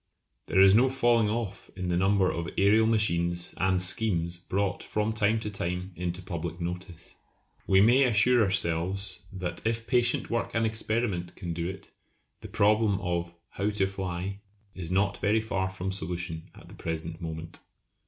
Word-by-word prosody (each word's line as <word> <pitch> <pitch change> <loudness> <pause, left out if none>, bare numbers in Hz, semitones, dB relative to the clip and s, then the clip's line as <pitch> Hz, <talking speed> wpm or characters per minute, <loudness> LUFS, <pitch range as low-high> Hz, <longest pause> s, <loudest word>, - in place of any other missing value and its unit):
There 95 - +2
is 95 0 +7
no 125 +5 +5
falling 120 -4 +2
off 110 -2 -4
in 90 -1 -4
the 90 - +1
number 95 +1 +3
of 85 0 -4
aërial 105 +5 +3
machines 85 -6 +1
and 95 -1 +2
schemes 90 -2 +1
brought 95 +1 -2
from 105 +1 -1
time 110 +1 +2
to 105 - -4
time 90 -1 -3
into 90 +1 -4
public 85 -1 -5
notice. 90 0 -7 0.5
We 95 0 +5
may 125 +6 +5
assure 120 +1 +4
ourselves 95 0 0
that 95 -3 -5
if 115 0 -1
patient 120 -1 +1
work 115 -1 -2
and 115 0 +2
experiment 110 -5 -1
can 85 -3 -5
do 85 +1 -3
it 95 -1 -10 0.5
the - - -9
problem 105 -1 +2
of 85 -1 -3
"how 100 +2 -2
to 105 -2 +1
fly" 95 0 -4 0.3
is 85 -3 -6
not 100 +2 +1
very 105 +2 +3
far 95 -4 -2
from 95 0 -4
solution 85 -2 -4
at - - -14
the - - -13
present 80 +1 -5
moment. 80 0 -6
95 Hz, 165 wpm, -28 LUFS, 85-110 Hz, 0.5 s, is